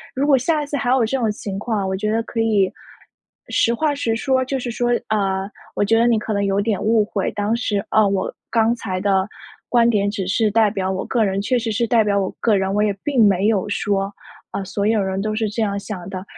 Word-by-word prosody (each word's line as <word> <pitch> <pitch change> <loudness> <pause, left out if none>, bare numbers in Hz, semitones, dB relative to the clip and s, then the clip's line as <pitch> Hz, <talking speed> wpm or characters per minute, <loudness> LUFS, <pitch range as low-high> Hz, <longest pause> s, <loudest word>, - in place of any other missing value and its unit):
如 270 +2 +1
果 280 -2 +5
下 300 +4 0
一 - - -5
次 285 0 -3
还 245 - -1
有 255 -3 +3
这 270 +4 -1
种 225 -3 +1
情 200 -2 -5
况， 210 -3 -2
我 190 - -1
觉 210 +2 -1
得 225 +1 0
可 230 - -5
以， 210 -4 +2 0.8
实 235 - +2
话 295 +4 0
实 230 -5 -1
说。 260 +1 +1
就 270 +1 -2
是 245 -2 -4
说： 240 +1 -1 0.2
“呃， 195 -2 0 0.2
我 - - +1
觉 225 +2 +3
得 235 - +4
你 235 -2 +3
可 215 +1 -4
能 200 -1 0
有 195 +1 +1
点 210 -1 -1
误 220 0 +3
会， 205 -2 -2
当 205 +1 -1
时， 205 -4 -1
啊， 215 -1 +4
我 195 -1 -1 0.2
刚 230 0 +2
才 190 -6 -4
的 195 -1 +2 0.4
观 235 -1 +4
点 205 -3 +2
只 200 -2 -3
是 215 +3 +2
代 220 0 +4
表 190 -2 -2
我 190 - -2
个 235 -3 +1
人， 195 0 -1
确 250 +4 +1
实 225 -1 -2
是 235 +3 +1
代 230 -2 +4
表 200 -1 +1
我 190 -1 -1
个 220 -3 +2
人， 190 0 -1
我 210 - +2
也 210 -1 +1
并 265 -6 +3
没 195 0 +3
有 210 -2 +1
说， 200 -1 -1 0.4
‘啊， 195 - -3
所 200 +1 -3
有 220 -1 +2
人 190 0 -2
都 215 +1 -2
是 220 -1 0
这 225 +2 -3
样 200 -1 -1
想 190 -4 -7
的’， 185 -1 -6
215 Hz, 270 characters per minute, -20 LUFS, 195-230 Hz, 0.8 s, 果